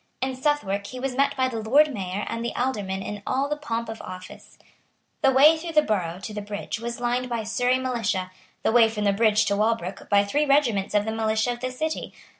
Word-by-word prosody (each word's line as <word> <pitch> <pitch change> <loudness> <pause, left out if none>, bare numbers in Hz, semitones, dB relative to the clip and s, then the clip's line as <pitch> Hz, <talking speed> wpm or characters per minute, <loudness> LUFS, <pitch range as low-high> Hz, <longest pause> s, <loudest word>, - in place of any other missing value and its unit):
In 260 0 -2
Southwark 255 -8 -1
he 255 - -7
was 265 0 -2
met 275 +2 +1
by 260 0 +2
the 235 -3 -4
Lord 285 +7 +4
Mayor 195 -1 -3
and 230 - -3
the 235 - -3
Aldermen 205 -7 -2
in 205 -1 -6
all 270 +2 +1
the 295 - -1
pomp 235 -6 -3
of 225 0 -7
office. 185 +1 -10 0.6
The 270 - +5
way 280 +5 +7
through 330 +1 -6
the 305 -1 +5
Borough 180 - -1
to 215 - -5
the 210 - -4
bridge 205 +1 -5
was 235 +1 -5
lined 245 +1 -1
by 235 -2 -1
the - - -8
Surrey 245 +3 +1
militia; 225 -8 -2 0.3
the - - +2
way 230 -1 +6
from 210 -1 -3
the 200 -1 +3
bridge 215 0 +3
to 200 0 +1
Walbrook 205 -3 -1
by 200 -1 +5
three 295 +9 0
regiments 235 -9 +2
of 205 0 +3
the 220 - -2
militia 220 +1 0
of 240 - -5
the 255 +1 -2
City. 310 +5 -4
230 Hz, 230 wpm, -25 LUFS, 205-260 Hz, 0.6 s, way